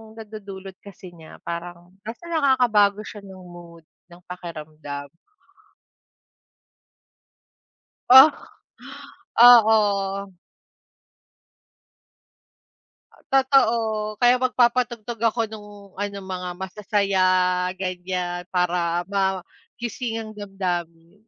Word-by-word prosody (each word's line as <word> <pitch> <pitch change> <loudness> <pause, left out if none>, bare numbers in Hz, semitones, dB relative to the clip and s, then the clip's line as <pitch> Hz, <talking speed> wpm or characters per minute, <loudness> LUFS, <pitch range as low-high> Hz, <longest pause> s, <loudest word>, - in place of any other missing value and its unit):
nadudulot 200 -3 -10
kasi 190 -2 -13
niya, 160 -2 -14
parang 175 +1 -7
basta 230 - -9
nakakabago 240 -9 +2
siya 210 - -10
ng 190 -2 -13
mood, 170 -2 -14 0.2
ng 175 0 -17
pakiramdam. 155 -5 -8 3.0
O? 260 +1 +11 1.2
Oo. 205 -5 +5 3.0
Totoo. 230 -6 +2
Kaya 245 +2 +3
magpapatugtog 240 -2 0
ako 230 +1 +1
'nung 210 -1 -11 0.2
ano, 200 0 -5
mga 180 -1 -5
masasaya, 200 0 -1 0.6
ganyan, 180 -1 -4
para 175 -1 0
magising 200 +5 -4
ang 220 -1 -7
damdamin. 180 -3 -5
200 Hz, 75 wpm, -23 LUFS, 180-225 Hz, 3.0 s, O